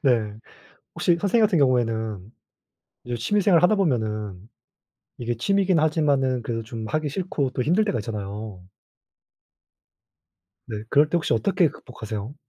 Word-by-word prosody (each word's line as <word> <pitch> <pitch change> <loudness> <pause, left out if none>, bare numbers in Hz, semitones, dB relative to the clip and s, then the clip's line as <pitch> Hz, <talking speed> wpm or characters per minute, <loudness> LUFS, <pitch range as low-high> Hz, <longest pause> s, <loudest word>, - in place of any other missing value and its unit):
네. 115 -7 +2 0.6
혹시 175 - +2
선생님 215 +3 +3
같은 190 -5 +1
경우에는 110 -7 0 0.8
이제 120 0 -3
취미 205 - +1
생활을 180 -3 +4
하다 215 +4 +5
보면은 110 - -1 0.8
이게 120 0 -2
취미이긴 195 - +2
하지만은 145 -5 +1
그래도 115 0 -3
좀 110 0 -7
하기 155 +3 -1
싫고 150 -4 -2
또 125 - -2
힘들 180 - +2
때가 130 - -1
있잖아요. 105 -3 -6 2.0
네. 110 -3 -5
그럴 150 +1 +4
때 175 - 0
혹시 160 - 0
어떻게 165 - +2
극복하세요? 110 -3 -7
125 Hz, 310 characters per minute, -24 LUFS, 110-165 Hz, 2.0 s, 하다